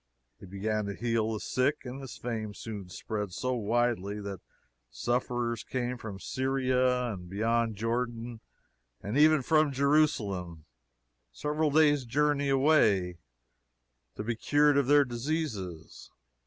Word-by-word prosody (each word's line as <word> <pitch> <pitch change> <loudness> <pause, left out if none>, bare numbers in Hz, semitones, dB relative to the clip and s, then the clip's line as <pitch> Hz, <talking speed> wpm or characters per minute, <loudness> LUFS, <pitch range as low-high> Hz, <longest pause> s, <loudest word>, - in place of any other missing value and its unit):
He - - -11
began 105 +3 -2
to 100 0 -4
heal 115 -1 0
the 110 - -3
sick, 135 +7 0
and 130 +2 -6
his 135 - -8
fame 110 -3 -4
soon 100 -5 -7
spread 105 0 -4
so 130 +6 -1
widely 110 -3 0
that 100 -3 -6 0.5
sufferers 120 - -1
came 125 0 -3
from 105 -4 -7
Syria 130 -1 0
and 90 -2 -9
beyond 115 +3 0
Jordan, 115 +1 -3 0.6
and 105 +4 -3
even 155 -1 +5
from 155 +1 +3
Jerusalem, 110 - +1 0.7
several 150 - -1
days' 145 -2 +4
journey 145 +2 +1
away, 110 - +3 1.0
to - - -4
be 115 +1 -2
cured 145 +5 +3
of 140 -2 +2
their 145 0 +6
diseases. 120 - -4
120 Hz, 130 wpm, -29 LUFS, 105-135 Hz, 1.0 s, their